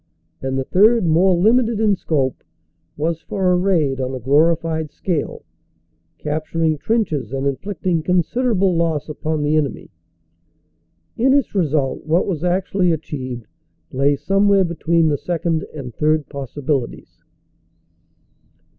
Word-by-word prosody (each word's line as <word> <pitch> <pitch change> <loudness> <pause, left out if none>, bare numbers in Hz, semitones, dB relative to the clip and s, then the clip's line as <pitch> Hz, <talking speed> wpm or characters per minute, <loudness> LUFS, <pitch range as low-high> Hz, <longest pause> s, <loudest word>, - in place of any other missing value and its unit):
And 135 0 -2
the 135 - 0
third, 215 - +4
more 175 +3 +3
limited 225 +3 +3
in 215 -2 +3
scope, 140 -7 -1 0.5
was 160 +2 -1
for 190 -2 0
a - - +4
raid 165 -8 +1
on 130 0 -3
a - - -5
glori 150 +7 +3
fied 160 -1 -3
scale, 165 -1 -3 0.7
capturing 155 +1 -1
trenches 160 - -1
and 135 0 -3
inflicting 175 +4 -1
considerable 185 +3 +1
loss 165 -3 0
upon 155 0 -2
the 150 +1 +1
enemy. 150 -3 -2 1.3
In 265 +3 +3
its 280 -3 +1
result 150 -8 0
what 165 +3 +2
was 170 -5 -3
actually 180 0 +1
achieved 130 -7 -5 0.5
lay 140 +2 +2
somewhere 195 +6 +3
between 170 -1 +1
the 145 -2 0
second 170 -2 -2
and 135 -6 -8
third 155 +2 +1
possibilities. 140 -1 -4
160 Hz, 130 wpm, -20 LUFS, 145-185 Hz, 1.3 s, third